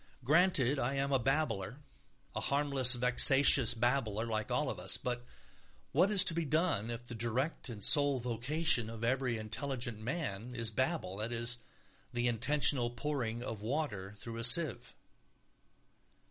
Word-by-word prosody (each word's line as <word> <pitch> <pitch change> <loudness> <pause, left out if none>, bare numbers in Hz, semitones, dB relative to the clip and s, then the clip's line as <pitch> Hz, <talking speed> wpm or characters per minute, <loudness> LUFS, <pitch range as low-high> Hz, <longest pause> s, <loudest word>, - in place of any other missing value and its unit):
Granted 150 -2 +2
I 130 +3 -2
am 140 +1 -2
a 135 - +2
babbler, 120 -5 -2 0.6
a - - -2
harmless 140 -3 +3
vexatious 125 0 +4
babbler, 115 -2 -1
like 110 -2 -3
all - - -1
of - - -8
us. - - +3
But 120 -1 -5 0.7
what 195 - +2
is 205 -3 +5
to - - +4
be 170 0 -2
done 155 - -1
if 120 +1 -6
the 120 - -8
direct 120 +7 -3
and 105 -4 -8
sole 145 +2 +5
vocation 125 +1 -1
of 115 0 -9
every 125 0 -1
intelligent 120 +1 -5
man 125 - -5
is 115 -2 -2
babble, 130 - -2
that 110 +3 -4
is, 120 +1 0 0.5
the 120 0 -1
intentional 125 +1 +2
pouring 120 -2 -4
of 110 -4 -6
water 105 -6 -4
through 115 +2 -8
a 115 - -5
sieve? 135 +3 +3
125 Hz, 150 wpm, -32 LUFS, 115-140 Hz, 0.7 s, is